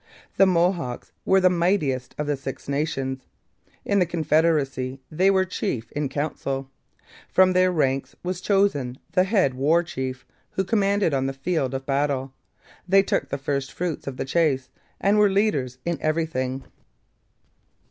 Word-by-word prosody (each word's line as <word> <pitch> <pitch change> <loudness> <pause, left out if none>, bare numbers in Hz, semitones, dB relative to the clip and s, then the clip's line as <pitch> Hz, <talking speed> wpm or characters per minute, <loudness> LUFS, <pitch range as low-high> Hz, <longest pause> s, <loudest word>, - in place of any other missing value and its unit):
The 195 - +6
Mohawks 170 -8 0
were 190 - +5
the 185 -1 +4
mightiest 170 -8 0
of 150 - -2
the 145 0 0
Six 135 0 -7
Nations; 135 -2 -2 0.6
in 200 - +2
the 180 - +4
confederacy 155 -5 +1
they 185 +5 +3
were 190 -1 +3
chief 135 - -3
in 145 -2 -2
council; 135 -2 -3 0.6
from 185 0 +4
their 185 0 +4
ranks 135 -5 0
was 180 0 -3
chosen 180 -12 +1
the 185 - +3
head 190 - +2
war 150 +7 +2
chief, 130 -6 -5 0.3
who 190 - 0
commanded 200 -4 +1
on 135 -1 +1
the 135 - -2
field 135 -2 -1
of 135 0 -4
battle; 135 -1 -1 0.5
they 195 +1 +5
took - - -1
the 140 - -2
first 140 0 -2
fruits 175 -5 -4
of 135 -2 -5
the - - -2
chase, 135 -3 +1 0.3
and 205 +2 +3
were 210 -1 +5
leaders 190 - 0
in 170 -3 -2
everything. 145 -5 -1
150 Hz, 155 wpm, -24 LUFS, 135-185 Hz, 0.6 s, The